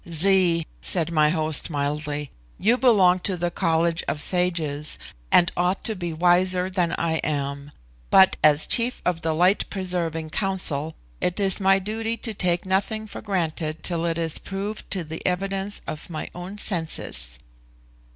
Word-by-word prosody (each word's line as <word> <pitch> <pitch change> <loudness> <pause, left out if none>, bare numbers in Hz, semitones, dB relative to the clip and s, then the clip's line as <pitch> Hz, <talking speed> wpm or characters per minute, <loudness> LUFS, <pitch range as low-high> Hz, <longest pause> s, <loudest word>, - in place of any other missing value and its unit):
"Zee," 170 -1 +3 0.2
said 170 -2 -1
my 155 -2 +3
host 155 -1 -1
mildly, 145 0 -3 0.3
"you 225 +5 +3
belong 200 -8 +4
to 185 0 0
the 175 0 -1
College 165 +1 +1
of 150 - -2
Sages, 160 -4 0 0.3
and 175 0 +5
ought 180 +2 0
to 220 - 0
be 175 -3 -4
wiser 180 +2 +2
than 175 -3 0
I 165 -1 -1
am; 140 -1 -3 0.4
but, 190 0 +6
as 150 0 +5
chief 245 +1 +2
of 175 -2 0
the 160 -1 -1
Light 180 +5 +2
preserving 170 -4 -3
Council, 160 -6 0 0.3
it 180 +3 0
is 195 -1 +3
my 195 0 +5
duty 220 +4 -3
to 225 -2 -4
take 180 -3 0
nothing 200 +3 -1
for 210 - -9
granted 165 -5 -2
till 170 -2 -1
it 165 0 -1
is 165 -2 +1
proved 200 +2 -6
to 185 -3 -1
the 160 +1 -7
evidence 195 +2 -2
of 155 - -7
my 155 -2 -5
own 180 +3 -8
senses." 160 - 0
175 Hz, 160 wpm, -24 LUFS, 160-190 Hz, 0.4 s, but